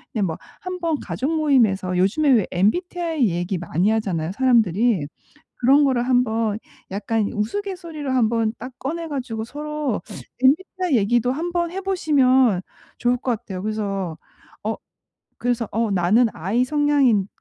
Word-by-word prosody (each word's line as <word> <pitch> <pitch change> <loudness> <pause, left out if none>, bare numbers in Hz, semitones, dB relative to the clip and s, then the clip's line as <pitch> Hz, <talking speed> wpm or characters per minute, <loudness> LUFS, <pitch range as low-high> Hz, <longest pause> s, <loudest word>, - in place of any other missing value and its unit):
예. 215 - 0
뭐 165 -5 -1 0.2
한번 350 -5 -2
가족 285 +5 -3
모임에서 215 - +2
요즘에 225 +12 +2
왜 220 -7 +4
MBTI 320 - +1
얘기 175 +2 -2
많이 175 +3 0
하잖아요 185 -7 -1
사람들이. 225 - +2 0.5
그런 275 +4 +4
거를 255 -3 +2
한번 225 -4 +1 0.3
약간 205 +2 -1
우스갯소리로 330 - -4
한번 230 -2 +2
딱 255 +1 -8
꺼내 330 +5 -4
가지고 245 -6 -4
서로 295 -2 -3 0.4
MBTI 335 +2 +2
얘기도 235 +4 +2
한번 345 +3 -2
해 385 - -3
보시면 265 - +3 0.4
좋을 245 0 +1
것 245 -3 -1
같아요. 190 -5 -7
그래서 200 -5 -3 0.5
어 - - -1 0.6
그래서 240 -2 -1
어 225 0 0
나는 195 +6 +3
I 200 +10 0
성향인 280 -7 +2
240 Hz, 300 characters per minute, -22 LUFS, 205-295 Hz, 0.6 s, 왜